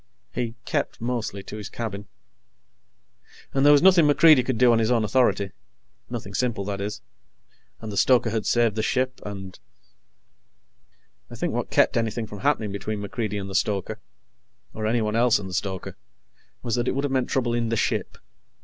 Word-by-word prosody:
He 120 Hz, -2 st, -3 dB
kept -, -, -2 dB
mostly 115 Hz, -4 st, -3 dB
to 105 Hz, -, -8 dB
his 105 Hz, -2 st, -7 dB
cabin. 105 Hz, -3 st, -6 dB, 1.5 s
And 135 Hz, -, +2 dB
there 145 Hz, -, +7 dB
was 145 Hz, +2 st, +5 dB
nothing 180 Hz, -5 st, +6 dB
MacReidie 150 Hz, -2 st, +6 dB
could 125 Hz, -1 st, -2 dB
do 125 Hz, 0 st, +5 dB
on 115 Hz, -, +3 dB
his 110 Hz, 0 st, +1 dB
own 120 Hz, -3 st, +2 dB
authority 100 Hz, -3 st, +1 dB, 0.6 s
nothing 115 Hz, -5 st, -6 dB
simple, 115 Hz, -4 st, -1 dB
that 100 Hz, -1 st, -4 dB
is. 105 Hz, +1 st, -5 dB, 0.8 s
And 110 Hz, -1 st, -6 dB
the 100 Hz, -, -5 dB
stoker 120 Hz, -1 st, +3 dB
had 110 Hz, -1 st, -2 dB
saved 115 Hz, -3 st, +2 dB
the 110 Hz, -, 0 dB
ship, 130 Hz, +3 st, -1 dB
and... 95 Hz, -4 st, -8 dB, 1.7 s
I -, -, -9 dB
think -, -, -2 dB
what -, -, -2 dB
kept -, -, +3 dB
anything 115 Hz, 0 st, -1 dB
from 105 Hz, -2 st, -9 dB
happening 110 Hz, -5 st, 0 dB
between 100 Hz, +2 st, -4 dB
MacReidie 105 Hz, 0 st, -3 dB
and 95 Hz, -, -5 dB
the 95 Hz, -, -7 dB
stoker, 95 Hz, -1 st, -1 dB, 0.7 s
or 110 Hz, 0 st, -3 dB
anyone 110 Hz, -1 st, 0 dB
else 120 Hz, 0 st, +4 dB
and 100 Hz, -, -7 dB
the 95 Hz, -, -8 dB
stoker, 95 Hz, 0 st, -3 dB, 0.7 s
was 115 Hz, -, -2 dB
that 120 Hz, +1 st, 0 dB
it -, -, 0 dB
would 140 Hz, -, -1 dB
have 145 Hz, -, -1 dB
meant 130 Hz, -2 st, 0 dB
trouble 120 Hz, -3 st, 0 dB
in 120 Hz, -1 st, 0 dB
the 115 Hz, -, 0 dB
ship. -, -, -1 dB
115 Hz, 185 wpm, -24 LUFS, 100-125 Hz, 1.7 s, there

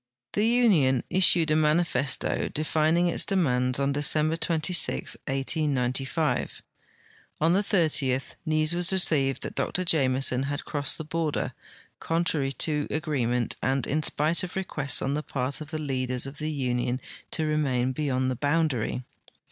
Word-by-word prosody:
The 210 Hz, +2 st, +1 dB
union 185 Hz, -, +3 dB
issued 170 Hz, -3 st, +5 dB
a -, -, +3 dB
manifesto, 155 Hz, -2 st, +1 dB
defining 155 Hz, +3 st, +1 dB
its 170 Hz, -, +1 dB
demands, 130 Hz, -10 st, +1 dB
on 140 Hz, 0 st, +1 dB
Decem 150 Hz, +2 st, +2 dB
ber -, -, 0 dB
'2b, 165 Hz, -, +1 dB
1805. 135 Hz, +1 st, -1 dB, 0.8 s
On 165 Hz, +2 st, +3 dB
the 195 Hz, -, +3 dB
30th 155 Hz, -, 0 dB
news 155 Hz, +1 st, +1 dB
was 175 Hz, +1 st, +3 dB
received 150 Hz, -8 st, +2 dB
that -, -, -5 dB
Dr 185 Hz, -, -2 dB
Jameson 130 Hz, -5 st, +3 dB
had 145 Hz, 0 st, -4 dB
cro.ssed 145 Hz, -3 st, -2 dB
the 160 Hz, -, -5 dB
border, 155 Hz, -1 st, -2 dB, 0.5 s
contrary 165 Hz, -4 st, 0 dB
to 150 Hz, +3 st, -1 dB
agreement 130 Hz, -6 st, -1 dB
and 130 Hz, -1 st, 0 dB
in 155 Hz, +3 st, -1 dB
spite 155 Hz, +2 st, +1 dB
of 180 Hz, -, -6 dB
requests 150 Hz, -8 st, 0 dB
on 135 Hz, -, -1 dB
the 150 Hz, -, -1 dB
part 135 Hz, 0 st, -3 dB
of 155 Hz, -, -8 dB
the 155 Hz, -, -4 dB
leaders 130 Hz, -4 st, -1 dB
of 135 Hz, +1 st, -8 dB
the 155 Hz, 0 st, -2 dB
union 125 Hz, -3 st, -1 dB, 0.3 s
to 160 Hz, -, -2 dB
remain 135 Hz, -5 st, 0 dB
beyond 130 Hz, -2 st, -1 dB
the -, -, -2 dB
boundary. 145 Hz, -4 st, -1 dB
150 Hz, 150 wpm, -26 LUFS, 135-160 Hz, 0.8 s, issued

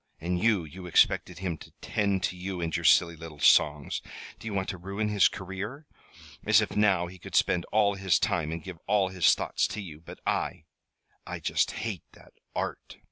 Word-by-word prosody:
And 90 Hz, +2 st, -1 dB
you 110 Hz, -6 st, +3 dB
you 90 Hz, +4 st, -9 dB
expected 90 Hz, 0 st, +3 dB
him 90 Hz, -4 st, -3 dB
to -, -, -12 dB
tend 100 Hz, -3 st, 0 dB
to 95 Hz, -, -1 dB
you 90 Hz, 0 st, -5 dB
and 85 Hz, -1 st, -2 dB
your -, -, -2 dB
silly 85 Hz, -1 st, +5 dB
little 80 Hz, -2 st, -10 dB
songs. 75 Hz, 0 st, +3 dB, 0.4 s
Do -, -, -8 dB
you 105 Hz, -, -3 dB
want 95 Hz, -1 st, -1 dB
to 95 Hz, -4 st, -5 dB
ruin 100 Hz, +4 st, -3 dB
his 105 Hz, -2 st, +5 dB
career? 100 Hz, -, -6 dB, 0.6 s
As 110 Hz, 0 st, +5 dB
if 105 Hz, -, -2 dB
now 100 Hz, -4 st, +3 dB
he 90 Hz, +1 st, -11 dB
could -, -, -8 dB
spend 85 Hz, -1 st, +2 dB
all 105 Hz, -1 st, +2 dB
his 95 Hz, -2 st, +2 dB
time 80 Hz, -3 st, 0 dB
and 80 Hz, -1 st, -5 dB
give 90 Hz, -2 st, -8 dB
all 100 Hz, -2 st, +3 dB
his 90 Hz, -3 st, +4 dB
thoughts -, -, 0 dB
to 95 Hz, +2 st, -6 dB
you! 85 Hz, -7 st, -8 dB
But 85 Hz, -, -11 dB
I -, -, -1 dB, 0.6 s
I -, -, -5 dB
just -, -, +1 dB
hate 110 Hz, -6 st, -3 dB
that -, -, -18 dB, 0.2 s
Art!" -, -, -4 dB
95 Hz, 200 wpm, -28 LUFS, 85-100 Hz, 0.6 s, silly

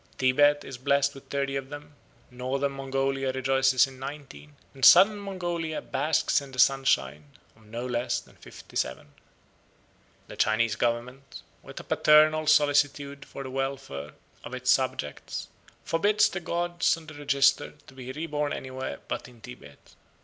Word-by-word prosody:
Tibet 145 Hz, +3 st, +3 dB
is 130 Hz, -2 st, -9 dB
blessed 140 Hz, +1 st, +2 dB
with 135 Hz, -, -14 dB
thirty 140 Hz, -1 st, -2 dB
of 135 Hz, -1 st, -4 dB
them, 145 Hz, 0 st, -10 dB, 0.4 s
Northern 130 Hz, +3 st, -2 dB
Mongolia 135 Hz, 0 st, -2 dB
rejoices 135 Hz, 0 st, +3 dB
in 135 Hz, -1 st, -13 dB
nineteen, 135 Hz, -, -9 dB, 0.2 s
and 135 Hz, -1 st, -12 dB
Southern 210 Hz, +1 st, +8 dB
Mongolia 175 Hz, -5 st, -4 dB
basks 155 Hz, -1 st, 0 dB
in 140 Hz, -1 st, -11 dB
the 130 Hz, -, -11 dB
sunshine 75 Hz, -, +2 dB, 0.3 s
of 110 Hz, -1 st, -22 dB
no 115 Hz, +3 st, -5 dB
less 120 Hz, 0 st, -1 dB
than -, -, -19 dB
fifty -, -, -14 dB
seven. 70 Hz, +3 st, -3 dB, 1.1 s
The -, -, -10 dB
Chinese 110 Hz, 0 st, +1 dB
government, 125 Hz, +4 st, -3 dB, 0.2 s
with -, -, -10 dB
a -, -, -9 dB
paternal 155 Hz, +1 st, +4 dB
solicitude 145 Hz, -2 st, +2 dB
for 135 Hz, -, -8 dB
the 130 Hz, -, -7 dB
welfare 135 Hz, -, -4 dB, 0.3 s
of 130 Hz, -, -7 dB
its 125 Hz, 0 st, +1 dB
subjects, 130 Hz, -, -2 dB, 0.3 s
forbids 205 Hz, +5 st, +2 dB
the 190 Hz, -, -4 dB
gods 175 Hz, 0 st, 0 dB
on 165 Hz, -, -13 dB
the 155 Hz, -, -11 dB
register 140 Hz, -1 st, +2 dB
to -, -, -16 dB
be 130 Hz, -1 st, -8 dB
reborn 150 Hz, 0 st, -3 dB
anywhere 130 Hz, 0 st, -6 dB
but -, -, -4 dB
in 125 Hz, -2 st, -17 dB
Tibet. 110 Hz, -, -14 dB
135 Hz, 150 wpm, -27 LUFS, 125-145 Hz, 1.1 s, Southern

